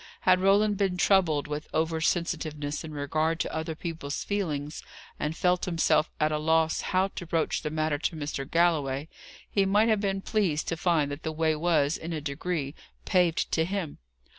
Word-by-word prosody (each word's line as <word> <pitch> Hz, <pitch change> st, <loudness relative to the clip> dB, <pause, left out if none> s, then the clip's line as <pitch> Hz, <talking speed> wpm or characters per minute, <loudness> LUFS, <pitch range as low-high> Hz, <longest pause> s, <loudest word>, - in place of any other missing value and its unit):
Had 185 Hz, 0 st, +4 dB
Roland 205 Hz, +2 st, +4 dB
been 190 Hz, -2 st, 0 dB
troubled 180 Hz, -7 st, +3 dB
with 150 Hz, +1 st, -4 dB
over 160 Hz, 0 st, 0 dB
sensitiveness 155 Hz, -3 st, -1 dB
in 160 Hz, -, -7 dB
regard 155 Hz, +3 st, -1 dB
to -, -, -2 dB
other 160 Hz, 0 st, -3 dB
people's 160 Hz, -4 st, -4 dB
feelings, 155 Hz, -8 st, -3 dB, 0.4 s
and 155 Hz, +2 st, -2 dB
felt 180 Hz, 0 st, +2 dB
himself 165 Hz, -2 st, +2 dB
at 155 Hz, 0 st, +2 dB
a 150 Hz, -, 0 dB
loss 160 Hz, +1 st, +2 dB
how 190 Hz, +1 st, +1 dB
to 185 Hz, -, -7 dB
broach 165 Hz, -1 st, 0 dB
the -, -, -3 dB
matter 155 Hz, -1 st, -1 dB
to 165 Hz, -, -1 dB
Mr. 145 Hz, -3 st, -4 dB
Galloway, 155 Hz, -5 st, +1 dB, 0.4 s
he 200 Hz, -, +1 dB
might 205 Hz, +4 st, +3 dB
have 215 Hz, -2 st, +2 dB
been 195 Hz, -1 st, -1 dB
pleased 190 Hz, -9 st, 0 dB
to 165 Hz, -, -1 dB
find 160 Hz, -4 st, +1 dB
that 145 Hz, +2 st, -6 dB
the 160 Hz, -, -3 dB
way 160 Hz, 0 st, +1 dB
was, 155 Hz, -2 st, +2 dB
in 165 Hz, +1 st, -5 dB
a 155 Hz, -, -2 dB
degree, 150 Hz, 0 st, -3 dB, 0.3 s
paved 180 Hz, -4 st, +2 dB
to 160 Hz, -, +2 dB
him. 180 Hz, -3 st, -3 dB
160 Hz, 185 wpm, -28 LUFS, 150-180 Hz, 0.4 s, Had